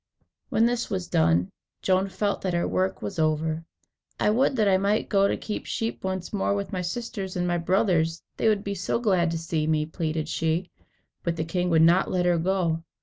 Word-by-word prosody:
When 225 - +3
this 240 0 0
was 185 -3 -2
done, 85 +3 +2 0.3
Joan 190 +1 +2
felt 200 +2 -1
that 185 -2 -1
her 170 - +1
work 185 +1 -1
was 195 -4 -4
over. 155 +1 0 0.5
"I 210 - +3
would 260 +4 +2
that 215 -4 +2
I 190 -1 +5
might 200 +2 +1
go 195 -2 +4
and - - 0
keep 210 - -5
sheep 225 0 -3
once 190 0 -3
more 200 0 +1
with 200 +1 -4
my 185 - -1
sisters 190 0 -4
and 180 0 0
my 175 0 +1
brothers; 170 -3 +1
they - - +1
would 205 -2 +1
be 200 - -3
so 190 +3 -1
glad 190 -7 +2
to 165 - -2
see 160 -1 -2
me," 155 -1 +1
pleaded 155 -1 -3
she. 165 +3 -1 0.5
But 170 -1 -1
the 160 -1 -2
king 180 +2 -1
would 160 -1 +5
not 175 +3 +4
let 180 -1 0
her 175 -1 +3
go. 170 -2 0
180 Hz, 210 wpm, -26 LUFS, 165-200 Hz, 0.5 s, I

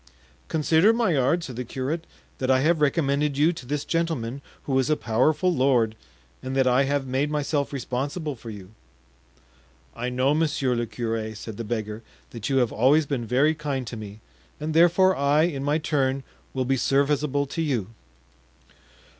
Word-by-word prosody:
"Consider, 160 +6 +3
Maillard," 170 - +2
said 130 -7 -7
the 125 - -2
curate, 135 +7 -4 0.3
"that 130 - -1
I 130 0 +4
have 160 +2 +2
recommended 145 -1 +1
you 155 +4 +4
to 130 -7 -10
this 145 +1 -2
gentleman, 140 -7 -2 0.2
who 135 -2 +1
is 130 - 0
a 155 - +2
powerful 155 +10 +1
lord, 125 -6 +2 0.5
and 130 +1 -4
that 135 -1 +3
I 130 +2 +3
have 140 0 0
made 135 +3 0
myself 145 -1 -1
responsible 140 +3 -3
for 115 -1 -10
you." 100 -3 -10 1.2
"I 125 +2 -3
know, 130 +3 +1
monsieur 150 -5 +1
le 120 -1 -1
curé," 110 -2 -3
said 110 -1 -8
the 115 - -4
beggar, 110 -1 -4 0.3
"that 115 -3 -5
you 135 - +2
have 125 -3 +2
always 140 +7 +3
been 130 -5 -3
very 140 +7 +3
kind 145 -4 -3
to 115 - -6
me, 105 -1 -9 0.4
and 155 +1 -3
therefore 175 +3 +5
I, 145 +2 +3
in 145 -5 -1
my 145 +2 +1
turn, 135 -4 0 0.3
will 130 -1 0
be 135 +1 +1
serviceable 140 +1 +1
to 155 +4 -4
you." 125 - -1
135 Hz, 170 wpm, -25 LUFS, 125-150 Hz, 1.2 s, therefore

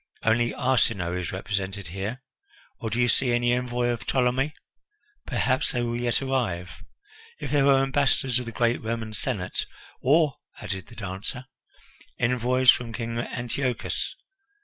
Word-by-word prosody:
"Only 120 +1 +3
Arsinoe 115 -9 +1
is 90 -1 -3
represented 95 -1 -3
here. 100 +8 -4 0.6
Or 115 - -3
do 115 +3 -1
you 120 - +4
see 125 +2 +3
any 120 0 +3
envoy 125 0 0
of 120 -2 -3
Ptolemy? 130 +3 +1 0.7
Perhaps 130 0 +1
they 120 -2 0
will 120 0 -1
yet 120 +2 +1
arrive. 105 -10 -1 0.7
If - - -5
there 145 -2 +4
were 135 -1 +5
ambassadors 135 -2 +3
of 125 - -6
the - - -4
great 120 +1 +1
Roman 110 -1 -3
Senate 105 -6 -2 0.2
" - - -24
"Or," 150 +1 +4 0.2
added 95 -1 -5
the 120 - -13
dancer, 100 +4 -5 0.7
"envoys 125 +1 +5
from 115 -2 -3
King 115 0 -3
Antiochus. 125 +2 -2
120 Hz, 150 wpm, -26 LUFS, 110-130 Hz, 0.7 s, were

